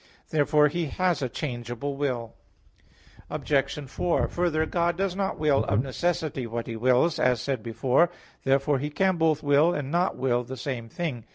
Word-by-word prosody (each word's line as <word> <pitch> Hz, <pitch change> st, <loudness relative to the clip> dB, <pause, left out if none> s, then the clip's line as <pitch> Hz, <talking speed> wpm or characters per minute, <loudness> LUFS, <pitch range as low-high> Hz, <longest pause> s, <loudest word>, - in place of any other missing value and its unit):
Therefore 150 Hz, -1 st, +4 dB
He 170 Hz, +3 st, -2 dB
has 180 Hz, +1 st, 0 dB
a 130 Hz, -, -1 dB
changeable 120 Hz, +1 st, -4 dB
will. 125 Hz, -5 st, -2 dB, 1.0 s
Obj. 140 Hz, 0 st, -1 dB
4: 170 Hz, +6 st, 0 dB
Further, 165 Hz, -3 st, 0 dB
God 170 Hz, +1 st, 0 dB
does 195 Hz, -1 st, -1 dB
not 195 Hz, 0 st, -1 dB
will 150 Hz, -3 st, +2 dB
of 110 Hz, +2 st, +1 dB
necessity 150 Hz, -2 st, -2 dB
what 115 Hz, 0 st, -4 dB
He 115 Hz, -, -5 dB
wills, 130 Hz, +8 st, +2 dB
as 125 Hz, -2 st, +3 dB
said 135 Hz, -2 st, -2 dB
before 120 Hz, +7 st, +2 dB
(A. -, -, -7 dB
3). 175 Hz, -, -21 dB, 0.3 s
Therefore 135 Hz, +1 st, +2 dB
He 145 Hz, +3 st, -2 dB
can 190 Hz, +4 st, +1 dB
both 160 Hz, -2 st, +2 dB
will 145 Hz, +4 st, +4 dB
and 140 Hz, -1 st, -3 dB
not 175 Hz, +2 st, +1 dB
will 125 Hz, -2 st, +1 dB
the 130 Hz, +2 st, -7 dB
same 120 Hz, -5 st, -4 dB
thing. 130 Hz, -7 st, -4 dB
145 Hz, 180 wpm, -26 LUFS, 125-165 Hz, 1.0 s, Therefore